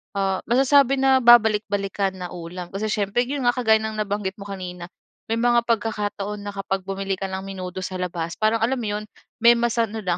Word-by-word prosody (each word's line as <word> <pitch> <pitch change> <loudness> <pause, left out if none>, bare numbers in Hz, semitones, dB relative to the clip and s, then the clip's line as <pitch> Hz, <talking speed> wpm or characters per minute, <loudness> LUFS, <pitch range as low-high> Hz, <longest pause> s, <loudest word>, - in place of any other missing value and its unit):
ah, 195 -1 0
masasabi 270 +2 +4
na 265 0 +4
babalik-balikan 210 -4 +3
na 180 -1 -5
ulam. 175 +1 -7
Kasi 205 +2 -2
siyempre, 210 +3 0
yun 280 0 -3
nga 245 - +4
kagaya 220 -4 +4
ng 220 0 -4
nabanggit 200 -2 -3
mo 200 - -8
kanina, 180 -3 -7 0.4
may 225 - 0
mga 240 0 +3
pagkakataon 210 -2 -2
na 205 - -5
kapag 195 -1 -2
bumili 195 0 -3
ka 195 - -2
ng 190 0 -4
menudo 185 -1 -6
sa 185 - -6
labas, 170 -2 -3
parang 220 +1 +2
alam 250 +4 +2
mo 225 - -3
yun, - - -8 0.4
may 235 0 +8
masa 235 0 +1
ano 220 +1 -6
lang, 175 -2 0
205 Hz, 200 wpm, -23 LUFS, 190-230 Hz, 0.4 s, may